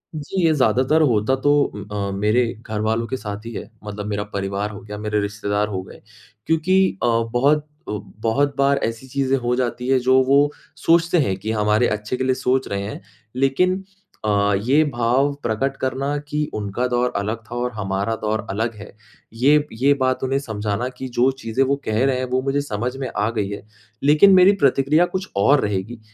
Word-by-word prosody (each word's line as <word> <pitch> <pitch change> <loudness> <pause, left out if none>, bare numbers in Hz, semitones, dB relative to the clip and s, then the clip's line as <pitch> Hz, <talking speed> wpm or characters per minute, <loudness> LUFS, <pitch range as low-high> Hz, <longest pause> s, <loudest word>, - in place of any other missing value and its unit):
जी, 155 +5 -3
ये 160 - +4
ज़्यादातर 130 +3 +2
होता 120 -3 +2
तो 140 +2 +1 0.4
अ, 100 -1 -2
मेरे 105 +5 +2 0.2
घरवालों 110 +1 -1
के 130 - -3
साथ 105 -1 -7
ही 115 - -6
है। 105 - -7
मतलब 105 0 -6
मेरा 105 -1 -2
परिवार 100 +1 -2
हो 100 - -8
गया 105 0 -8
मेरे 105 0 -1
रिश्तेदार 105 0 -1
हो 95 -3 -3
गए, - - -14 0.4
क्योंकि 185 - +2
अ, - - +3 0.3
बहुत, 145 +5 +2 0.2
ब 105 -1 -6
बहुत 140 +6 +1
बार 140 0 +3
ऐसी 115 +3 -3
चीज़ें 135 0 0
हो 120 0 0
जाती 125 0 -2
हैं 135 - +4
जो 130 +1 +4
वो 140 +1 +5 0.5
सोचते 170 +1 +4
हैं 95 - 0
कि 110 +3 -4
हमारे 105 +2 +2
अच्छे 105 +4 -3
के 130 - -2
लिए 130 0 +1
सोच 130 0 0
रहे 100 0 -3
हैं, 100 0 -6 0.3
लेकिन 180 +9 +1 0.4
अ, 100 -1 +2
ये 140 +6 +4
भाव 125 +4 +2
प्रकट 125 +4 -1
करना 135 +3 -2
कि 150 0 -2
उनका 105 +3 -2
दौर 125 0 0
अलग 105 +3 -2
था - - -4
और 125 0 -1
हमारा 100 0 -2
दौर 110 0 -1
अलग 110 +4 -1
है। 105 0 -11 0.4
ये 145 +6 +3
ये 140 +2 +5
बात 130 0 0
उन्हें 135 +1 +1
समझाना 110 -2 -3
कि 130 - -5
जो 125 +2 +5
चीज़ें 115 +4 0
वो 140 +1 +1
कह 110 +3 +1
रहे 135 -2 +1
हैं 130 - -2
वो 130 0 +1
मुझे 135 +2 0
समझ 125 -1 -3
में 135 -1 -3
आ 105 +1 +1
गई 105 -4 -2
है, 100 - -6 0.4
लेकिन 150 +8 +6
मेरी 185 +1 +7
प्रतिक्रिया 140 +5 +4
कुछ 190 +1 -4
और 135 +9 +4
रहेगी। 105 +4 -3
120 Hz, 195 wpm, -21 LUFS, 105-135 Hz, 0.5 s, मेरी